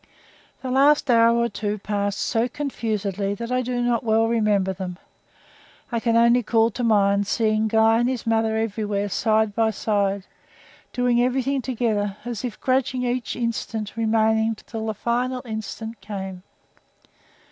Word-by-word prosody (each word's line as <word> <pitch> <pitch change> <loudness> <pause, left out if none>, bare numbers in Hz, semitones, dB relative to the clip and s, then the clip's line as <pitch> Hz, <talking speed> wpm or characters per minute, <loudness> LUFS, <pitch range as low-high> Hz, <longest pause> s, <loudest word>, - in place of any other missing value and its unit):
The 255 - -3
last 280 +1 +4
hour 230 0 +5
or 235 0 +2
two 210 -1 -3
passed 205 -1 -2
so 230 +3 0
confusedly 210 -8 -3
that 235 +3 -6
I 255 0 +1
do 245 0 -2
not 240 -1 +1
well 225 0 +2
remember 210 -4 +1
them. 180 -1 -6 0.9
I 235 - 0
can 230 0 +1
only 235 +1 +5
call 225 0 +2
to 245 - -4
mind 200 -3 +3
seeing 220 -1 +1
Guy 225 +1 +4
and 240 +1 +2
his 255 -2 -3
mother 225 -1 +1
everywhere 210 -2 -2
side 220 0 +1
by 225 +1 +2
side, 200 -2 -1 0.7
doing 245 -1 +2
everything 265 +2 0
together, 220 -5 -1
as 240 -2 -4
if 240 -4 -5
grudging 260 -1 0
each 245 -4 -2
instant 225 -2 -3
remaining 220 0 +2
till 220 +1 -7
the 220 - -2
final 245 +4 -1
instant 220 0 -6
came. 190 -2 -6
225 Hz, 150 wpm, -23 LUFS, 210-240 Hz, 0.9 s, hour